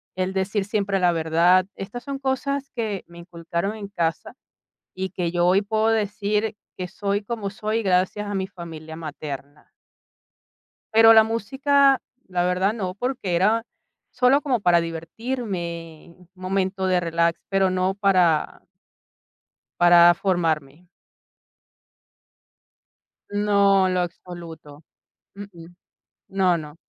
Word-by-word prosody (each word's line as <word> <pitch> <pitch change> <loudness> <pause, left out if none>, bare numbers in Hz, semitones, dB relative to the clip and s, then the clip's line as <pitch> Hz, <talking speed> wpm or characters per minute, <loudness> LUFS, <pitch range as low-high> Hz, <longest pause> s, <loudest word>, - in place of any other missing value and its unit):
el 185 +1 -2
decir 195 +1 -1
siempre 200 -1 -1
la 180 -1 +3
verdad. 170 +3 +3
Estas 240 +5 -7
son 275 -1 -5
cosas 275 +1 -2
que 215 -5 -3
me 170 0 -14
inculcaron 170 +3 -4
en 210 -2 -7
casa 165 -5 -3 0.6
y 190 -1 -4
que 175 -2 -2
yo 175 0 +2
hoy 190 +3 +4
puedo 220 +1 0
decir 210 0 0 0.2
que 180 -1 -5
soy 200 +2 -2
como 205 -1 -4
soy 215 +3 -2
gracias 190 +2 +1
a 205 - -4
mi 190 -1 -1
familia 165 -4 -9
materna. 150 -2 -8 1.2
Pero 225 0 +8
la 220 -1 +8
música 270 +5 +2 0.3
la 180 -1 0
verdad 180 +3 +1
no, 190 -5 -4
porque 245 -4 -3
era 215 +6 +2 0.5
solo 250 +3 +3
como 260 -7 0
para 175 -3 +4
divertirme, 170 -2 -5
un 180 -2 -21
momento 190 +1 -2
de 185 -1 +2
relax, 170 0 0
pero 195 -1 +2
no 185 +1 0
para 185 -6 +2 1.2
para 175 0 +7
formarme. 170 -3 -2 2.4
No, 200 -2 +3
en 185 - 0
lo 180 - +1
absoluto. 165 -4 -8 0.5
Mm, 200 +1 -8
mm. 170 0 -13 0.5
No, 190 -2 +2
no. 150 0 -10
190 Hz, 125 wpm, -23 LUFS, 170-210 Hz, 2.4 s, Pero